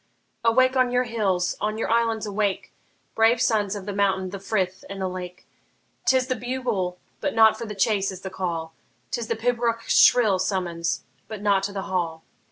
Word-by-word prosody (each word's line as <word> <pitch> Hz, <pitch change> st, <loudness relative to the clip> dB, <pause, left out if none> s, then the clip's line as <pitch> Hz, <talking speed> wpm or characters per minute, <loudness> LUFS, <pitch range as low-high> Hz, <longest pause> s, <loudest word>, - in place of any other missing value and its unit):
Awake 255 Hz, +3 st, +4 dB
on 255 Hz, -1 st, +3 dB
your 250 Hz, 0 st, +2 dB
hills, 200 Hz, -7 st, 0 dB
on 215 Hz, +1 st, -1 dB
your 225 Hz, -, -2 dB
islands 230 Hz, -1 st, +1 dB
awake, 205 Hz, -1 st, -2 dB, 0.4 s
Brave 225 Hz, +2 st, +4 dB
sons 210 Hz, -4 st, +1 dB
of 200 Hz, -2 st, -7 dB
the 205 Hz, -, -4 dB
mountain, 190 Hz, -2 st, 0 dB
the 200 Hz, -, -6 dB
frith, 190 Hz, -2 st, -2 dB
and 195 Hz, 0 st, -6 dB
the 190 Hz, -, -1 dB
lake! 180 Hz, 0 st, -7 dB, 0.6 s
'T 260 Hz, -, +5 dB
is 255 Hz, -, 0 dB
the 255 Hz, 0 st, -1 dB
bugle 240 Hz, -8 st, -2 dB, 0.2 s
but 285 Hz, -, -2 dB
not 220 Hz, -1 st, +6 dB
for 230 Hz, +1 st, -6 dB
the 210 Hz, -, -6 dB
chase 195 Hz, 0 st, +1 dB
is 190 Hz, -1 st, -9 dB
the 190 Hz, -, -6 dB
call; 165 Hz, -4 st, -3 dB, 0.4 s
'T 240 Hz, -, -2 dB
is 225 Hz, -, -4 dB
the 230 Hz, -, -1 dB
pibroch's 230 Hz, 0 st, +1 dB
shrill 220 Hz, -6 st, +5 dB
summons 180 Hz, -3 st, -1 dB, 0.2 s
but 215 Hz, -2 st, -7 dB
not 200 Hz, -2 st, +3 dB
to 200 Hz, +1 st, -3 dB
the 195 Hz, -1 st, -4 dB
hall. 170 Hz, -4 st, -2 dB
205 Hz, 195 wpm, -24 LUFS, 190-230 Hz, 0.6 s, not